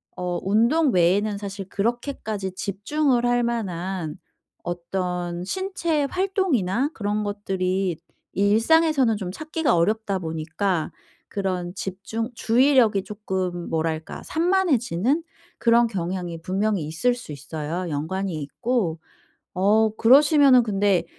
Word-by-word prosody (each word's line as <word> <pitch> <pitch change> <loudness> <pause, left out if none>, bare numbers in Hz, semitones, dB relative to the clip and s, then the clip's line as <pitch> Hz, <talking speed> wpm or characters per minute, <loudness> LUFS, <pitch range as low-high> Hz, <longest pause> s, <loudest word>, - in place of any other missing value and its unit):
어 180 -1 -2
운동 235 - +3
외에는 200 +4 +2
사실 200 -1 -6
그렇게까지 220 -3 -2
집중을 240 +7 0
할 245 0 +2
만한 190 -7 -3 0.5
어떤 175 0 -3
신체 340 - -1
활동이나 295 - 0
그런 210 0 -2
것들이 190 -3 -1 0.4
일상에서는 230 - +3
좀 185 -3 -4
찾기가 310 - 0
어렵다 200 +3 +1
보니까 160 +1 -2 0.4
그런 185 -3 -3
집중 200 +5 -4
주의력이 235 -4 +3
쪼끔 190 -4 -4
뭐랄까 160 0 -2
산만해지는 315 - +1 0.3
그런 235 0 +4
경향이 175 -4 -4
분명히 195 -1 0
있을 240 +11 0
수 240 -10 -10
있어요 155 +5 -5
연관이 175 +6 -2
있고, 195 - -1 0.5
어 210 +4 +3
그러시면은 275 +1 +6
근데 200 -4 +1
200 Hz, 260 characters per minute, -24 LUFS, 180-245 Hz, 0.5 s, 그러시면은